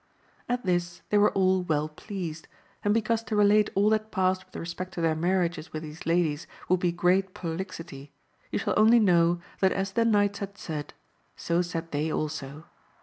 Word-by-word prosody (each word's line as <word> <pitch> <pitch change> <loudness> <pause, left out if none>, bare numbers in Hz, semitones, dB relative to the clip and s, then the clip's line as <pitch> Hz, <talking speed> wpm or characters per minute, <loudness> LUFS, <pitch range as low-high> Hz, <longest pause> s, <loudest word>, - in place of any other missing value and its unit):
At 245 -2 -1
this 175 -1 -1
they 210 - +5
were 205 - +5
all 190 -1 +3
well 155 -4 0
pleased, 165 -1 -7 0.4
and 205 - +2
because 225 +1 +1
to 215 - -2
relate 210 0 +4
all 205 +2 +4
that 215 0 0
passed 185 -1 +1
with 185 - -25
respect 185 +2 -6
to 170 - -3
their 165 -1 +2
marriages 170 0 0
with 155 0 -5
these 155 +1 -9
ladies 165 -3 +1 0.2
would 185 0 +3
be 175 -1 +1
great 185 +2 +1
prolixity, 165 -5 -6 0.4
you - - -1
shall - - -1
only 225 +3 +6
know 175 -4 +3 0.2
that 190 -1 +3
as 195 0 -2
the 230 +4 +2
knights 205 -3 +2
had 200 0 -6
said, 150 -6 -6 0.4
so 170 +1 0
said 165 -2 -4
they 150 +2 -1
also. 155 0 -4
180 Hz, 185 wpm, -27 LUFS, 165-200 Hz, 0.4 s, only